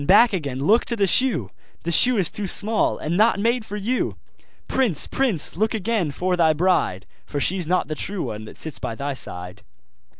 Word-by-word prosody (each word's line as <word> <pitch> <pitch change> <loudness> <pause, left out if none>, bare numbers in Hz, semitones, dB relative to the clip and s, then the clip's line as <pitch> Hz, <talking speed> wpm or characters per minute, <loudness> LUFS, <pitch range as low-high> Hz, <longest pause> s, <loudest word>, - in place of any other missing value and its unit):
back 220 +4 +6
again! 145 -8 -3
look 205 - +3
to 235 - -2
the 205 -3 +2
shoe! 180 - +2 0.3
The 170 - -2
shoe 245 +8 +4
is 185 -5 +1
too 205 -2 -4
small, 215 +4 +2
and 160 +3 -3
not 215 +1 +3
made 235 +3 +1
for 210 -1 -7
you! 230 +5 -2 0.5
Prince! 235 - +3
prince! 230 - +1
look 220 +5 0
again 215 -5 -1
for 180 +6 -1
thy 165 -3 +3
bride, 155 - 0 0.2
For 145 - -3
she's 180 +2 0
not 180 -4 +1
the 155 - -3
true 190 +4 -3
one 110 0 -6
that - - -12
sits 160 -3 -7
by 115 - -4
thy 140 +3 -3
side. 90 -5 -5
185 Hz, 200 wpm, -22 LUFS, 145-220 Hz, 0.5 s, back